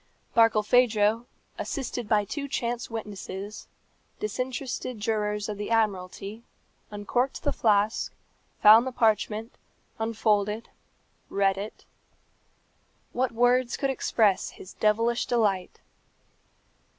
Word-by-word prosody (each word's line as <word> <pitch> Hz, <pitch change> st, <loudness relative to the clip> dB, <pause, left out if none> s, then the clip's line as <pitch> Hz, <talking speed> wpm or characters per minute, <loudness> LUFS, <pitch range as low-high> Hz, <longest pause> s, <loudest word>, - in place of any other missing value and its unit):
Barkilphedro, 225 Hz, 0 st, +4 dB, 0.3 s
assisted 245 Hz, -5 st, -4 dB
by 210 Hz, -1 st, +3 dB
two 280 Hz, +7 st, -4 dB
chance 240 Hz, -3 st, -2 dB
witnesses, 205 Hz, -2 st, -7 dB, 0.5 s
disinterested 255 Hz, +2 st, -3 dB
jurors 210 Hz, -1 st, -1 dB
of 210 Hz, -1 st, -5 dB
the 205 Hz, -, -4 dB
Admiralty, 205 Hz, -1 st, -1 dB, 0.5 s
uncorked 230 Hz, +6 st, -2 dB
the 285 Hz, -, 0 dB
flask, 210 Hz, 0 st, +2 dB, 0.5 s
found 220 Hz, +4 st, +8 dB
the -, -, -2 dB
parchment, 220 Hz, -1 st, +1 dB, 0.5 s
unfolded, 215 Hz, -1 st, 0 dB, 0.6 s
read 195 Hz, -1 st, +2 dB
it. 200 Hz, +2 st, -7 dB, 1.3 s
What 255 Hz, 0 st, 0 dB
words 245 Hz, +1 st, +2 dB
could 275 Hz, -1 st, 0 dB
express 215 Hz, -6 st, +1 dB
his 185 Hz, -, -12 dB
devilish 230 Hz, +3 st, +1 dB
delight! 205 Hz, -6 st, 0 dB
220 Hz, 95 wpm, -27 LUFS, 210-240 Hz, 1.3 s, found